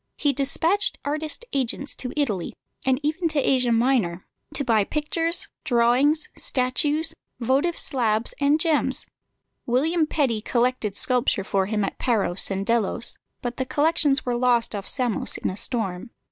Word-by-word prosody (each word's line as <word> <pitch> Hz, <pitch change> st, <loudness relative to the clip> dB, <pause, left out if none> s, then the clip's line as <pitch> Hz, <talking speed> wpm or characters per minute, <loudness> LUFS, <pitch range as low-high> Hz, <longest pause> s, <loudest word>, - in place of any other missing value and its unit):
He 290 Hz, -1 st, +2 dB
despatched 320 Hz, +9 st, +2 dB
artist 310 Hz, +9 st, -2 dB
agents 275 Hz, +1 st, -1 dB
to 250 Hz, -, -5 dB
Italy, 215 Hz, -, -1 dB, 0.3 s
and 260 Hz, 0 st, +3 dB
even 315 Hz, +4 st, 0 dB
to 310 Hz, -2 st, 0 dB
Asia 255 Hz, -3 st, +2 dB
Minor, 225 Hz, -7 st, +1 dB, 0.3 s
to 280 Hz, -, 0 dB
buy 225 Hz, -5 st, +3 dB
pictures, 325 Hz, -, -1 dB, 0.2 s
drawings, 265 Hz, +4 st, +3 dB
statues, 295 Hz, +5 st, 0 dB, 0.3 s
votive 270 Hz, +8 st, +1 dB
slabs, 230 Hz, -6 st, +1 dB
and 285 Hz, +2 st, +3 dB
gems. 320 Hz, -2 st, +1 dB, 0.6 s
William 310 Hz, +7 st, +2 dB
Petty 260 Hz, -9 st, 0 dB
collected 235 Hz, -3 st, 0 dB
sculpture 250 Hz, -5 st, +1 dB
for 190 Hz, 0 st, 0 dB
him 210 Hz, -1 st, 0 dB
at -, -, -6 dB
Paros 200 Hz, -7 st, +1 dB
and 195 Hz, 0 st, -2 dB
Delos, 230 Hz, 0 st, 0 dB, 0.3 s
but 245 Hz, 0 st, -4 dB
the 260 Hz, -, 0 dB
collections 290 Hz, -1 st, +2 dB
were 245 Hz, -, 0 dB
lost 240 Hz, -2 st, +2 dB
off 200 Hz, -1 st, -5 dB
Samos 245 Hz, -6 st, +1 dB
in -, -, -2 dB
a -, -, -6 dB
storm. 205 Hz, -2 st, -1 dB
255 Hz, 145 wpm, -24 LUFS, 230-295 Hz, 0.6 s, and